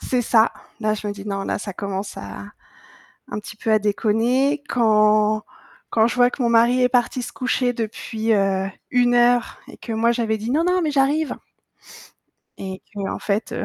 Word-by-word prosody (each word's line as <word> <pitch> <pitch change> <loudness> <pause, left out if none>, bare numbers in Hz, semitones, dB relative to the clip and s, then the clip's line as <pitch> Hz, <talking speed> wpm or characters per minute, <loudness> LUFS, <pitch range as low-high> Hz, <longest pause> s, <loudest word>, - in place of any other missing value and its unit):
C'est 250 -1 0
ça. 225 0 +3 0.3
Là, 215 -1 +1
je 210 0 -6
me 205 - -2
dis: 205 0 -10
«Non, 195 0 -2
là, - - -2
ça 200 - -6
commence 195 +1 -5
à 100 0 -8 0.8
un - - -4
petit 210 0 -10
peu 220 - -3
à 215 - +5
déconner». 235 +7 +1
Quand 215 -2 +3 0.5
quand 220 0 +3
je 235 - -2
vois 245 0 +4
que - - -9
mon 240 - +2
mari 235 +2 +4
est 250 - +4
parti 250 0 +1
se 240 - -6
coucher 250 -1 0
depuis, 225 -1 -3
heu, 195 -2 +1 0.2
1 245 -1 +3
heure 240 0 +3
et - - -12
que 230 - -7
moi 230 +2 +2
j'avais 225 -2 -1
dit: 220 +3 -4
«Non 320 +3 +2
non, 360 +1 +2
mais 305 -3 0
j'arrive!» 285 +3 +1 1.2
Et 190 -1 -7
qu'en 200 -1 -3
fait, 210 +2 -2
heu, - - -3
225 Hz, 195 wpm, -22 LUFS, 210-245 Hz, 1.2 s, à